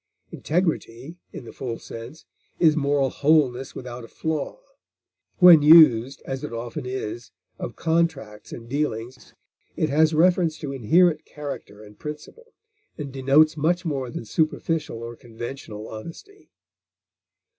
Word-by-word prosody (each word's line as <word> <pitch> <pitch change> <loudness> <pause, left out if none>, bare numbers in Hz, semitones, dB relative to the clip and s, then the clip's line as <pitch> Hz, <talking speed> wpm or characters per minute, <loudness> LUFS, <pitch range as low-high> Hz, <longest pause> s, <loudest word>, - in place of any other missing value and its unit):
Integrity, 160 -4 -2
in 125 - -9
the - - -11
full 120 -3 -5
sense, 115 +7 -10 0.3
is 155 -3 +4
moral 140 -3 +1
wholeness 140 -4 +1
without 125 -1 -8
a - - -10
flaw; 160 - -4 0.8
when 175 -4 +9
used, 145 -5 +6
as 135 0 -5
it - - -5
often 120 +1 -6
is, 120 -2 -5 0.3
of - - -6
contracts 160 -10 -1
and 115 -1 -9
dealings, 125 -3 -4 0.4
it 155 - 0
has 155 +2 +3
reference 170 -1 +3
to 145 - -6
inherent 155 +7 +3
character 140 -8 -8
and 105 0 -16
principle, 150 - -9 0.4
and 140 -3 -6
denotes 140 +4 +4
much 175 +4 0
more 135 -5 -2
than 115 - -7
superficial 155 -2 -2
or 120 0 -7
conventional 115 -2 -8
honesty. 170 - -11
140 Hz, 130 wpm, -24 LUFS, 120-160 Hz, 0.8 s, when